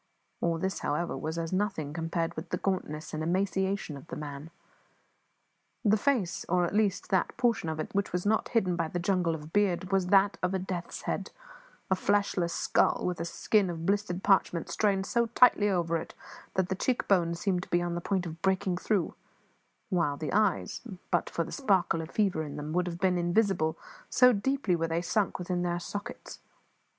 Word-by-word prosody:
All 170 -1 +1
this, 190 +3 -2
however, 150 +4 -1
was 160 +1 -4
as 165 +1 -3
nothing 185 -7 -1
compared 165 0 -2
with 160 +2 -6
the 180 - -1
gauntness 155 -5 -3
and 155 - -2
emaciation 190 0 0
of 140 +3 -11
the - - -6
man. 145 +1 -7 1.4
The 210 0 +5
face, 220 -6 0
or 180 0 +3
at 170 - -3
least 205 -2 +1
that 190 -2 +1
portion 230 -9 +1
of 160 0 -3
it - - -4
which 200 0 0
was 180 +1 -2
not 220 +1 +1
hidden 190 -7 +1
by 165 -1 -1
the 175 - -4
jungle 175 -2 +1
of 155 0 -10
beard, 195 -2 +1
was 190 -2 +2
that 195 +1 +4
of 180 +1 0
a - - +2
death's 185 -2 -5
head, - - -2 0.6
a - - +5
fleshless 195 -3 +1
skull - - +2
with 180 -2 -1
a 170 - -2
skin 200 +2 +1
of 165 -1 -4
blistered 195 -2 0
parchment 185 -4 +2
strained 195 -2 +1
so 235 +2 +1
tightly 230 -3 +5
over 170 -3 +1
it 160 - -8 0.4
that 190 -1 +1
the - - +1
cheek 245 +6 -1
bones 170 -3 +2
seemed 185 -2 0
to - - -10
be 175 - +3
on 175 0 -2
the 175 - -3
point 190 0 -1
of 165 0 -7
breaking 190 -1 +1
through; 195 -1 0 0.8
while 170 -6 +1
the 155 -1 -4
eyes, 210 -2 +1 0.3
but - - +1
for - - -1
the - - -9
sparkle 190 - +1
of 160 - -6
the - - -18
fever 195 -7 +2
in 150 -2 -6
them, 150 +1 -5
would 180 +1 +1
have 170 -1 -4
been 185 -1 +2
invisible, 175 -3 +1 0.3
so 250 0 +6
deeply 215 -2 +1
were 165 0 -1
they 165 +1 0
sunk 200 +1 0
within 180 0 -2
their 175 0 -1
sockets. 205 +3 -7
180 Hz, 200 wpm, -29 LUFS, 165-200 Hz, 1.4 s, so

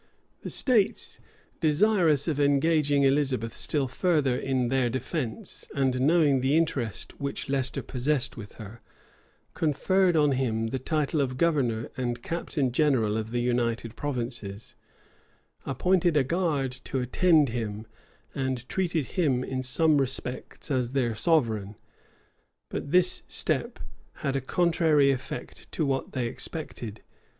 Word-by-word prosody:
The - - -6
states, 230 -7 +1 0.4
desirous 160 -2 +3
of 150 -3 -1
engaging 145 0 +3
Elizabeth 135 -5 +1
still 145 -3 0
further 145 -2 +1
in 130 -2 -1
their 130 -2 +1
defence, 130 - -4
and 130 -2 +1
knowing 145 -2 +4
the 135 +4 +2
interest 135 -10 -1
which 140 0 -4
Leicester 130 -2 0
possessed 130 +1 -1
with 105 -3 -9
her, 110 +1 -11 0.7
conferred 180 +4 +2
on 150 -2 +4
him 115 -4 0
the 130 - -3
title 150 +2 0
of 130 -2 -2
governor 130 -9 +1
and 120 -2 -3
captain 155 -5 -2
general 125 -6 +2
of 110 0 -3
the 120 +1 -1
united 120 -2 -1
provinces, 120 -7 -4 0.9
appointed 175 +4 +2
a 140 - +4
guard 150 -4 0
to 135 - -3
attend 150 +4 +3
him, 110 -2 -4 0.5
and 130 -2 -3
treated 170 -6 -1
him 135 -6 0
in 130 0 -3
some 150 +4 +3
respects 130 +2 -3
as 125 -2 0
their 125 -4 +1
sovereign. 110 - +1 0.9
But - - -5
this 180 +2 +4
step - - 0 0.4
had 135 - -3
a 135 - 0
contrary 160 -1 +3
effect 130 - -6
to 155 - 0
what 135 -1 -2
they 125 -2 -1
expected. 120 -4 -5
135 Hz, 130 wpm, -27 LUFS, 125-155 Hz, 0.9 s, knowing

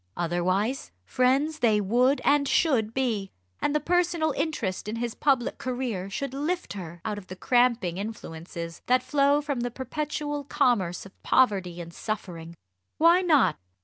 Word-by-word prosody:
Otherwise 185 - -1
friends 275 +5 +1
they 220 -4 +3
would 245 +7 +2
and 285 -1 +3
should 255 -9 +2
be; 230 -6 -1 0.3
and 290 - 0
the - - +4
personal 345 -1 +1
interest 255 - -2
in 215 - -3
his 235 0 -3
public 270 -4 +1
career 245 -7 -3
should 270 +6 -4
lift 315 - -2
her 175 -4 -8
out 210 -1 -2
of 185 - -15
the 185 - -8
cramping 235 -6 +2
influences 170 -5 -7
that 255 +1 +3
flow 285 0 +3
from 285 -3 -3
the 245 +1 -1
perpetual 295 +3 -4
commerce 235 -12 +1
of 195 - -16
poverty 190 -9 +2
and 170 -1 -8
suffering. 170 -6 -5 0.4
Why 335 +3 +5
not? 310 -8 +3
245 Hz, 150 wpm, -26 LUFS, 190-285 Hz, 0.4 s, Why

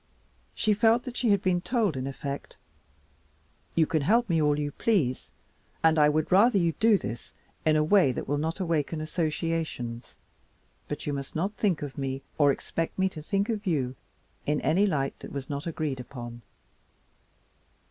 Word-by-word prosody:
She 215 - +2
felt 225 +3 +3
that 250 -2 -7
she 245 - +1
had 200 -2 +3
been 180 -1 +2
told 220 - 0
in 130 0 -3
effect, 140 +1 -6 1.2
"You 165 - +4
can 155 0 0
help 230 - +3
me 165 -2 +2
all 150 -1 +3
you 145 -1 -2
please, 150 - 0 0.5
and 160 -1 +5
I 150 0 +6
would 155 +3 0
rather 205 +4 +6
you 170 -3 +3
would - - -35
do 220 -2 +5
this 115 - -7 0.3
in 155 - +5
a 155 - +3
way 170 -3 +4
that - - -5
will 145 +1 0
not 160 +4 -2
awaken 165 -3 -1
associations, 155 -6 -3 0.7
but 145 - -5
you 145 - -1
must 140 -1 -5
not 190 +6 -1
think 190 -7 0
of 145 -1 -6
me 135 0 -3 0.2
or 145 -1 +6
expect 165 +4 -3
me 190 0 +2
to 160 -4 -9
think 200 +6 0
of 215 -3 -3
you 135 -7 0 0.5
in 150 0 +2
any 190 +6 +3
light 140 -7 -1
that - - -9
was 140 0 -5
not 145 +3 -4
agreed 150 -5 -2
upon." 120 -2 -8
155 Hz, 180 wpm, -28 LUFS, 140-190 Hz, 1.2 s, I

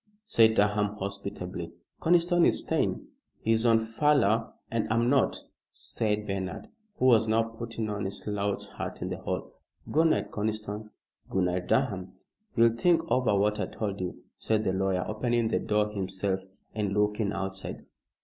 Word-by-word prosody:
said 110 - +5
Durham, 105 0 +2
hospitably. 95 -3 -5 0.3
"Conniston 175 +1 +4
is - - +3
staying." 160 - -1 0.3
"He's 115 +1 +2
on 115 -1 +6
furlough 115 -2 +2 0.2
and 115 -2 -1
I'm 115 +2 +3
not," 140 - +2 0.3
said 105 -1 -2
Bernard, 95 -2 -4 0.3
who - - +1
was 115 -3 +5
now 110 +1 +3
putting 115 0 -5
on 105 -1 -3
his 100 +1 -2
slouch 100 -1 -2
hat - - -4
in - - -3
the - - -4
hall. - - -4 0.4
"Good 160 +2 +4
night, 160 - +1
Conniston. 105 0 -3 0.4
Good 95 - +1
night, 90 0 -1
Durham." 100 -9 0 0.4
"You'll 115 -1 +5
think 165 +6 +3
over 125 -6 +3
what 105 +1 +2
I - - -1
told 100 -2 -4
you," 90 - -5
said 110 -1 0
the 95 - 0
lawyer, 95 -1 0
opening 120 +1 0
the - - +1
door 105 0 +1
himself 95 -1 -1 0.3
and 105 -2 -1
looking 105 0 +1
outside. 95 -1 -5
105 Hz, 160 wpm, -28 LUFS, 100-115 Hz, 0.4 s, on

